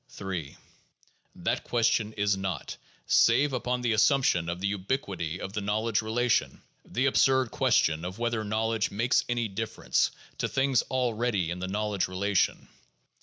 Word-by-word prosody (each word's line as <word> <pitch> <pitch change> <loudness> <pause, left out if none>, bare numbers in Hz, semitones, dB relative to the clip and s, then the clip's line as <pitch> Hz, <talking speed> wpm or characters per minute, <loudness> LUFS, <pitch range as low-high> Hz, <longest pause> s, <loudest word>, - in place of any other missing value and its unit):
Ill 95 -4 -3 0.9
That - - -2
question 110 -2 +1
is 105 -1 +1
not, 95 -6 -4 0.3
save 135 +5 +4
upon 125 0 -1
the 120 -2 +1
assumption 110 - +3
of 85 +1 -3
the 100 +1 -1
ubiquity 95 - -3
of 95 - -6
the 105 - -2
knowledge 110 +2 0
relation, 115 +2 0 0.2
the 130 +3 -1
absurd 130 -2 +3
question 80 0 +2
of 90 +2 -5
whether 120 -1 -1
knowledge 110 +1 0
makes 115 +5 +1
any 120 -2 0
difference 110 +2 -1 0.3
to - - -1
things 135 -2 +2
already 120 -8 0
in 90 - -4
the 95 - -3
knowledge 105 0 -1
relation. 95 +1 0
110 Hz, 145 wpm, -28 LUFS, 95-120 Hz, 0.9 s, save